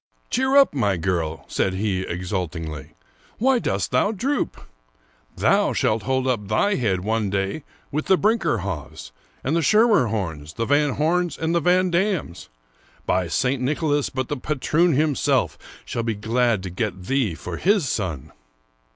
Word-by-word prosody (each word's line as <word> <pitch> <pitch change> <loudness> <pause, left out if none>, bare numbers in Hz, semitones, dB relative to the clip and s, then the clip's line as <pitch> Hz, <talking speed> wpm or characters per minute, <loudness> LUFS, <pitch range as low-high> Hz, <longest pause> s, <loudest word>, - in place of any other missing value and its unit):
" - - -41
Cheer 265 +2 +2
up, 275 - +6
my 105 -9 +1
girl," 80 -4 -2
said 95 -1 -1
he 95 -1 -1
exultingly; 85 -4 -4 0.2
'* - - -32
why 255 +2 +3
dost - - -2
thou 205 - +2
droop? 255 +8 -2 0.8
Thou - - +3
shalt 110 +1 +1
hold 130 +4 0
up 120 -6 -1
thy 155 - +2
head 105 - 0
one 110 +1 0
day 100 +9 -2 0.3
with 155 +2 -2
the 190 - +5
Brinckerhoffs, 105 - -1 0.3
and 145 +5 0
the 170 - +2
Schermerhorns, 110 - +2
the 115 - -1
Van 145 +1 +2
Homes, 170 +1 0
and 160 +1 -1
the 170 - +3
Van 180 +2 +3
Dams.^ 175 - -1 0.6
By 90 -1 +1
St. 130 +7 0
Nicholas, 145 +1 0
but 130 -1 -3
the 145 - -3
patroon 155 +5 +1
himself 150 -1 +1 0.3
shall 115 - -3
be 115 -1 -2
glad 115 -1 +1
to 95 - -5
get 95 -1 -3
thee 125 -6 0
for - - -6
his 195 -5 +2
son 90 - -3
125 Hz, 160 wpm, -23 LUFS, -, 0.8 s, up